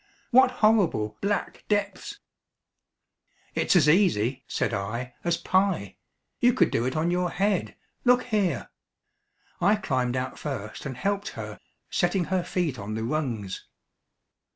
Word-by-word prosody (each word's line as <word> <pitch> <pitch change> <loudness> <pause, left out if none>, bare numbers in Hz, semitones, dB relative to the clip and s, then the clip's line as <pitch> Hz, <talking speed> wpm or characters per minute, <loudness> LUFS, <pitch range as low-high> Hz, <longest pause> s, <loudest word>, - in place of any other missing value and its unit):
"What 260 +1 +7 0.2
horrible, 165 - +2
black 200 0 -2
depths!" 205 - -1 1.4
"It's - - +2
as 155 -5 +5
easy," 140 - +3
said - - -1
I, 115 +6 -3
"as 170 -1 +1
pie. 185 - 0 0.4
You 245 0 +5
could - - +3
do 115 - +1
it 130 - -1
on 165 +3 +1
your 180 0 +1
head; 195 +1 0 0.3
look 250 0 +4
here 200 - -1 0.4
," - - -39
I 200 +5 +5
climbed 130 -10 -1
out 130 0 -4
first 130 -5 -5
and 130 -3 -6
helped 200 +6 -1
her, - - -6 0.3
setting 175 0 +1
her 185 -2 +2
feet 165 -10 -2
on 105 +2 -5
the 110 - -3
rungs. 115 -8 -3
170 Hz, 140 wpm, -26 LUFS, 125-200 Hz, 1.4 s, What